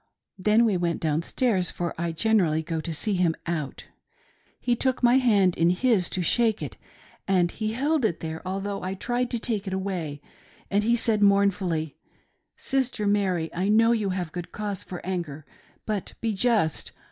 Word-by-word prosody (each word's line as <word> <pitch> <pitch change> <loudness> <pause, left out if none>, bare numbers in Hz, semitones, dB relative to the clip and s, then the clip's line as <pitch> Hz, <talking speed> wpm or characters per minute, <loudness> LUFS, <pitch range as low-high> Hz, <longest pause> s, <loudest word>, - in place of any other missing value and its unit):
Then 215 +5 +4
we 205 -5 +2
went 170 -1 -1
down 155 0 0
stairs, 190 -1 0
for 175 -1 -3
I 170 0 -2
generally 165 -3 +2
go 160 0 -3
to 170 - -4
see 200 +7 -1
him 175 -3 +2
out 155 -5 -4 0.7
He 245 - +1
took 260 +1 -1
my 245 +2 +6
hand 200 -8 +3
in 165 +1 +3
his 185 -1 +2
to 185 - -2
shake 225 +4 +2
it, - - -6 0.5
and 180 -3 +2
he 215 0 -3
held 290 +4 +1
it 175 -7 +1
there, 160 0 -5
although 195 +2 -3
I 190 +1 -3
tried 245 +4 -1
to 240 - -1
take 220 -3 -2
it 190 - -2
away, 180 -7 -3 0.5
and 205 +1 +2
he 235 +2 +3
said 225 -2 +1
mourn 200 0 +5
fully, 165 -6 -3 0.3
" - - -44 0.2
Sister 260 -5 -1
Mary, 190 -5 +1
I 185 +3 -1
know 225 +2 +5
you 215 -4 +1
have 180 -4 -3
good 175 0 -6
cause 205 -3 -4
for 180 -2 -8
anger; 170 -6 -4 0.4
but 210 -3 -3
be 225 -1 -1
just. 205 - +1
195 Hz, 185 wpm, -26 LUFS, 170-220 Hz, 0.7 s, my